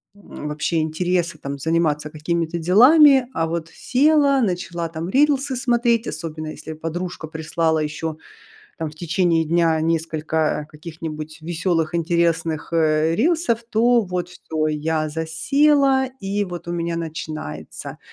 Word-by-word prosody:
м, 200 -6 -9
вообще 150 +2 -1
интереса, 170 +1 -1
там, 140 -1 -5
заниматься 155 -1 0
какими-то 165 +2 -2
делами. 255 - +6
А 165 - +1
вот 165 0 -3
села, 280 - +3
начала, 175 -5 -2
там, 165 +1 -5
рилсы 275 +2 +2
смотреть. 240 -2 +1
Особенно 155 0 -5
если 160 +1 -7
подружка 165 +2 -5
прислала 160 +1 -1
ещё, 155 +1 -3 0.6
там, 160 -2 -3
в - - -15
течение 170 0 +1
дня, 165 0 +2
несколько 160 -1 -1
каких-нибудь 155 0 -8
веселых, 170 -1 -1
интересных, 165 -2 0
э, 160 0 +2
рилсов, 310 - +1
то 235 +2 +4
вот 180 -2 -3
всё- 160 -3 -3
я 155 +1 -1
засела, 265 - +2
и, 200 +1 -1
вот, 175 -3 -7
у - - -2
меня 170 -1 -2
начинается. 160 - -6
165 Hz, 130 wpm, -21 LUFS, 155-195 Hz, 0.6 s, делами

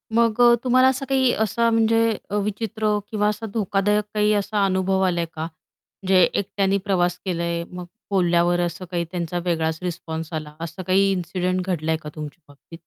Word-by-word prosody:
मग 230 0 +2
अ, 240 0 +7
तुम्हाला 255 +1 +5
असं 265 +1 0
काही 260 -2 +3
असा 230 +2 +1
म्हणजे 225 -1 +2
अ, 205 - -3
विचित्र 215 0 -1
किंवा 210 -1 +1
असा 215 +1 -4
धोकादायक 210 0 +1
काही 210 0 +2
असा 205 0 0
अनुभव 190 0 +1
आलाय 170 -2 0
का? 155 - -4
म्हणजे 185 +3 -2
एकट्याने 195 0 0
प्रवास 180 -3 +1
केलाय 170 -2 -1
मग 180 0 -7 0.3
बोलल्यावर 175 -2 +2
असं 175 +1 -3
काही 170 -1 -1
त्यांचा 175 -1 -3
वेगळाच 160 -2 0
रिस्पॉन्स 165 -2 -5
आला, 155 -1 -5
असं 165 +3 -6
काही 195 +1 +4
इन्सिडेंट 185 0 -1
घडलाय 160 -2 0
का 150 - -6
तुमच्या 150 +2 -8
बाबतीत? 145 +3 -15
185 Hz, 170 wpm, -23 LUFS, 170-210 Hz, 0.3 s, अ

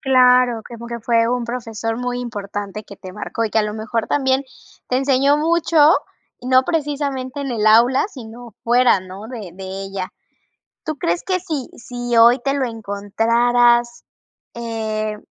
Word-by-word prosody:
Claro, 250 -3 +4
como 235 0 -9
que 235 0 -6
fue 230 0 +2
un 245 0 -1
profesor 225 -2 -4
muy 245 0 -3
importante 205 -2 -6
que 200 - -12
te 185 -1 -10
marcó, 220 +2 -3
y 220 - -2
que 220 - +1
a - - +3
lo 210 0 -3
mejor 220 +1 -2
también 265 -1 +1 0.4
te 255 - +1
enseñó 275 +1 +3
mucho, 320 -1 +4 0.5
no 255 +1 +4
precisamente 285 -3 -2
en 275 -1 -3
el 220 -3 -1
aula, 235 +4 +5
sino 235 - -11
fuera, 240 -3 +4
¿no?, 185 +3 -10
de 225 -7 -7
de 190 +1 -9 0.2
ella. 195 -1 -5 0.7
¿Tú 310 -2 -3
crees 170 -8 -1
que 370 -1 0
si 315 -8 -4
si 245 0 -4
hoy 235 +2 +7
te 275 +1 0
lo 280 -2 0
encontraras, 235 +3 +1 0.5
eh, 220 -2 -3
240 Hz, 160 wpm, -20 LUFS, 220-260 Hz, 0.7 s, hoy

